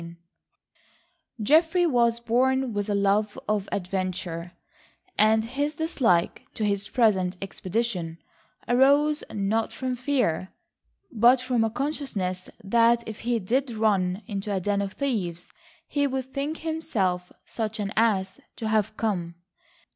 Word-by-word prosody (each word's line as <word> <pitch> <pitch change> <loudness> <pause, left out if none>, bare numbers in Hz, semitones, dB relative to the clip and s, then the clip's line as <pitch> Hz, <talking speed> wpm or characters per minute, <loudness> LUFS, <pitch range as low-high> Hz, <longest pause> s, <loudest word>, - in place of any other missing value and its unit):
III 170 0 -10 1.3
Geoffrey 325 - +4
was 235 -6 +3
born 255 +2 +1
with 205 0 -2
a 205 - +1
love 200 +1 +1
of 210 -2 -1
adventure, 180 -2 -3 0.6
and 220 +1 +4
his 285 +5 -2
dislike 255 - +1
to 215 - -1
his 200 0 -1
present 190 -7 +2
expedition 190 -3 -3 0.5
arose 285 +4 +4
not 215 +2 0
from 255 -1 -3
fear, 245 - 0 0.6
but 240 +3 +5
from 250 -2 +1
a 225 - +1
consciousness 220 -9 -3
that 235 +3 +3
if 220 -1 -7
he 240 0 0
did 250 +7 0
run 205 -4 +1
into 205 -1 -4
a 195 - 0
den 200 +2 0
of 200 0 -4
thieves 190 - -3 0.4
he 285 -1 +1
would 265 -1 -4
think 290 +3 -2
himself 210 - -1
such 220 -1 -4
an 205 -1 -2
ass 200 -4 +1 0.2
to 220 - -3
have 215 0 +1
come. 175 -6 -2
220 Hz, 130 wpm, -26 LUFS, 195-255 Hz, 1.3 s, but